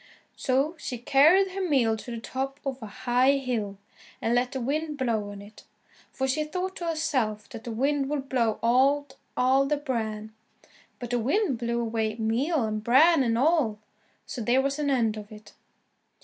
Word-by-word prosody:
So 275 +5 0
she 250 - -4
carried 315 +11 +4
her 390 +1 -4
meal 265 -11 +2
to 220 - -9
the 235 -1 -4
top 270 +4 -4
of 270 -1 -4
a 220 - -6
high 250 +5 +2
hill, 240 -7 -2 0.4
and 230 - 0
let 245 +1 +1
the 265 - -3
wind 300 +4 -2
blow 225 -6 -1
on 200 0 -9
it, 205 +1 -15 0.5
for 265 - -2
she 295 +4 0
thought 365 +5 -4
to 345 - -4
herself 260 -10 -1
that 230 +2 -9
the 235 - -4
wind 275 +4 0
would 285 -2 -3
blow 235 -5 +1
out 265 +4 +3 0.2
all 265 +2 +3
the 295 +1 +1
bran. 220 -6 -4 0.6
But 245 -1 -7
the 245 - +1
wind 275 - 0
blew 235 0 -1
away 225 -2 -1
meal 240 +7 0
and 215 -1 -2
bran 280 +7 +5
and 230 -3 +1
all 275 -6 +2 0.5
so 245 - -6
there 240 +4 +2
was 275 +2 -1
an 290 -1 0
end 230 -5 +1
of 210 0 -9
it. 215 0 -13
255 Hz, 185 wpm, -27 LUFS, 225-285 Hz, 0.6 s, bran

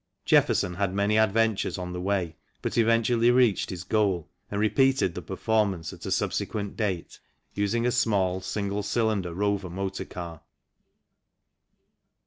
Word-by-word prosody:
Jefferson 90 - +3
had 95 +1 -1
many 100 +1 +2
adventures 110 -1 +2
on 90 -1 -5
the 90 - -4
way, 90 -4 -1 0.3
but - - -2
eventually 115 +1 +3
reached 120 -4 +3
his 90 -1 -5
goal 95 -5 0 0.2
and 100 - -3
repeated 130 -1 +2
the 90 - -5
performance 95 -4 -1
at - - -9
a - - -3
subsequent 100 -2 -2
date, 95 -6 -3 0.3
using 105 +4 0
a 125 - +2
small 95 -6 +1
single 100 +1 -2
cylinder 105 -3 0
Rover 100 +1 -1
motor 95 +2 -4
car. 85 -3 -8
100 Hz, 135 wpm, -27 LUFS, 95-110 Hz, 0.3 s, Jefferson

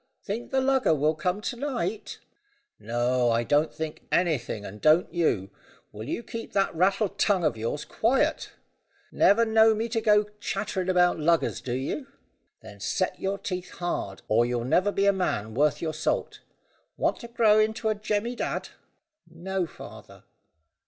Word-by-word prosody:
"Think 220 +4 -4
the 265 0 +1
lugger 260 -10 +3
will 150 +2 +2
come 180 +6 -2
to 245 - -3
night?" 235 -6 -3 0.6
"No, 120 +3 +1
I 115 0 +2
don't 150 +5 +2
think 160 -1 -6
anything, 140 - 0
and 105 +2 -9
don't 155 +3 +4
you. 100 - 0 0.4
Will 110 +1 -8
you 235 - -3
keep 230 0 -7
that 195 -1 +1
rattle 195 +5 +2
tongue 195 -2 +1
of 125 - +1
yours 115 +7 -3
quiet? 240 +4 +1 0.6
Never 230 +3 +4
know 220 0 +5
me 225 +2 -2
go 220 -2 +3 0.2
chattering 195 -2 -2
about 180 -2 +3
luggers, 165 +2 +1
do 120 - -4
you?" 130 +2 -2
"No, - - -6
father." 275 - -30 0.5
"Then - - -12
set - - -1
your 195 +1 -2
teeth 185 -2 -5
hard, 100 - -3
or 110 +2 +3
you'll 120 -1 -1
never 185 +10 +2
be 200 0 +1
a 200 - +5
man 110 - -2
worth 145 +6 +1
your 160 -1 -2
salt. 155 - -2 0.6
Want - - 0
to 235 - -8
grow 225 -2 +4
into 220 +1 0
a - - +2
Jemmy 215 +3 -2
Dadd?" - - -3 0.6
"No, 180 +2 -3
father." - - -12
180 Hz, 165 wpm, -26 LUFS, 145-215 Hz, 0.6 s, know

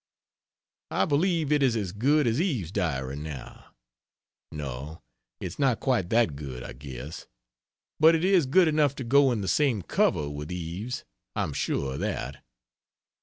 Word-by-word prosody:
I 95 - +1
believe 160 - +1
it 150 -1 +3
is 130 -4 +3
as 100 -5 -2
good 140 +9 +2
as 120 +6 +2
Eve's 125 - -1
Diary 70 -9 -1
now 75 -4 -8 0.9
no, 75 0 -6 0.4
it's - - -6
not 130 -6 +2
quite 115 -10 +1
that 115 -10 +3
good, 65 -4 -7
I - - -7
guess, 65 +2 -8 0.7
but 160 +2 +7
it 165 - 0
is 185 -7 +4
good 175 +6 +5
enough 150 -3 +2
to 135 - -5
go 135 +2 +5
in 115 -4 -1
the 95 - -3
same 130 -8 +2
cover 75 -2 +1
with 75 +3 -6
Eve's. 90 +7 -4 0.3
I'm 75 - -1
sure 70 0 -1
of 70 - -5
that. 70 +1 -3
105 Hz, 160 wpm, -27 LUFS, -, 0.9 s, but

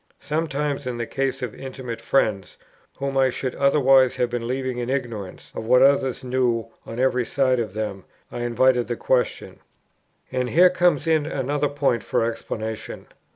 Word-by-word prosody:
Sometimes 150 -3 -2
in 125 -1 -3
the 120 - -2
case 135 +1 -2
of 120 - -4
intimate 130 -3 -7
friends, 105 -8 0 0.4
whom 140 0 -3
I 130 -1 +4
should 130 0 -3
otherwise 135 -2 +4
have 120 -1 0
been 120 -1 -3
leaving 130 0 -2
in 120 0 -3
ignorance 115 -8 -4
of 110 - -6
what 125 +2 +6
others 135 -2 +3
knew 125 -3 0 0.2
on 115 - -6
every 125 -1 +2
side 130 0 +1
of 110 -4 -4
them, 105 -3 -4 0.3
I - - -5
invited 120 +1 +2
the 120 - -2
question. 125 +1 -1 0.7
And 125 -1 -1
here 180 +5 +6
comes 175 -5 +2
in 160 -2 +2
another 145 0 -1
point 140 -5 0
for - - 0
explanation. 110 -1 -5
130 Hz, 165 wpm, -23 LUFS, 120-135 Hz, 0.7 s, what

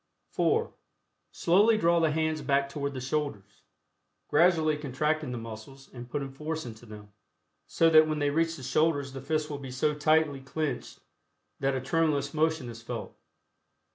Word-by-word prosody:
(4) 455 +2 +1 0.6
Slowly 205 +6 +4
draw 170 -4 +3
the 165 -1 +3
hands 155 0 0
back 140 0 +1
toward 140 -1 -4
the - - -3
shoulders, 130 -6 -4 0.7
gradually 160 -1 +4
contracting 150 +1 -1
the 125 - -4
muscles 115 +4 -10
and 120 -1 -9
putting 140 0 -4
force 155 +3 -5
into 115 0 -10
them, 105 -1 -12 0.5
so 165 - +3
that 155 -1 +7
when 155 -1 -1
they 145 -1 +1
reach 165 +2 +1
the 135 - -10
shoulders 140 0 +1
the 135 - -6
fists 155 +2 -1
will 145 -2 -5
be 135 -2 -8
so 130 +4 0
tightly 150 -1 +2
clenched 135 -1 -4 0.6
that 135 0 0
a 130 - -2
tremulous 145 -1 0
motion 160 -3 0
is 115 -1 -9
felt. 115 - -6
145 Hz, 165 wpm, -28 LUFS, 135-160 Hz, 0.7 s, that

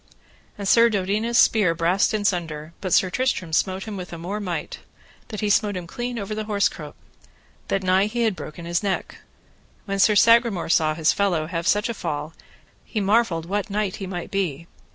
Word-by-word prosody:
And 200 -1 -4
Sir 235 +3 +6
Dodinas' 210 +3 0
spear 200 -9 +4
brast 175 +4 +2
in 215 -2 -2
sunder, 165 -4 -2
but 185 - -3
Sir 185 +2 +3
Tristram 190 -9 -1
smote 190 +3 0
him 215 -2 -6
with 180 -1 -7
a 170 - -6
more 185 +6 -4
might, 175 -6 -4 0.5
that 215 - -6
he 210 - 0
smote 205 -1 +2
him 180 - -6
clean 245 +4 -5
over 205 -1 -4
the 215 0 -4
horse 205 -2 +2
croup, - - -10 0.7
that 195 - -1
nigh 185 +2 +3
he 235 +2 -1
had 220 -4 +1
broken 170 0 -8
his 170 0 0
neck. 200 -2 -3 0.7
When 195 -1 -3
Sir 210 +2 +5
Sagramore 230 -4 +4
saw 155 -2 +3
his 160 0 +2
fellow 185 -6 0
have 165 +2 -3
such 210 +2 +2
a 235 - -2
fall 155 -5 -4 0.5
he 220 - -4
marvelled 200 -5 +1
what 205 +4 -2
knight 205 -1 -2
he 195 - -6
might 175 -2 -6
be. 170 -6 -2
195 Hz, 195 wpm, -23 LUFS, 170-215 Hz, 0.7 s, Sir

